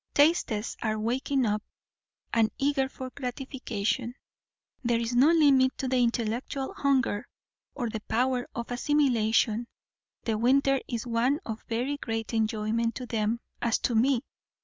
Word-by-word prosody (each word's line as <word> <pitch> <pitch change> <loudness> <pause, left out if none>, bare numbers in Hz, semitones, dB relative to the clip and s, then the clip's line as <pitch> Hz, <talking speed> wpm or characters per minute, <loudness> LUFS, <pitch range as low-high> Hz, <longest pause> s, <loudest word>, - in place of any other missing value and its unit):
Tastes 285 -8 +2
are 215 -1 0
waking 255 +4 0
up, 210 -1 0 0.7
and 225 -2 +4
eager 275 -1 +1
for 260 -1 -7
gratification; 250 -3 -3 0.7
there 235 -1 +2
is 230 +1 -2
no 260 +4 +6
limit 280 -6 +5
to 265 - -2
the 255 -1 +2
intellectual 240 +3 -1
hunger 265 -7 +1 0.5
or 245 -4 -2
the 220 -1 -4
power 250 +1 +1
of 235 0 -5
assimilation; 240 -4 +2 0.6
the 220 -2 -1
winter 270 +3 +3
is 235 -2 -3
one 245 +5 +1
of 225 -1 -5
very 250 +5 -1
great 225 -3 -4
enjoyment 225 +1 0
to 255 - -5
them 225 0 -1 0.2
(as 230 -1 +2
to 240 - -1
me!) 245 +2 +3
240 Hz, 140 wpm, -28 LUFS, 225-265 Hz, 0.7 s, no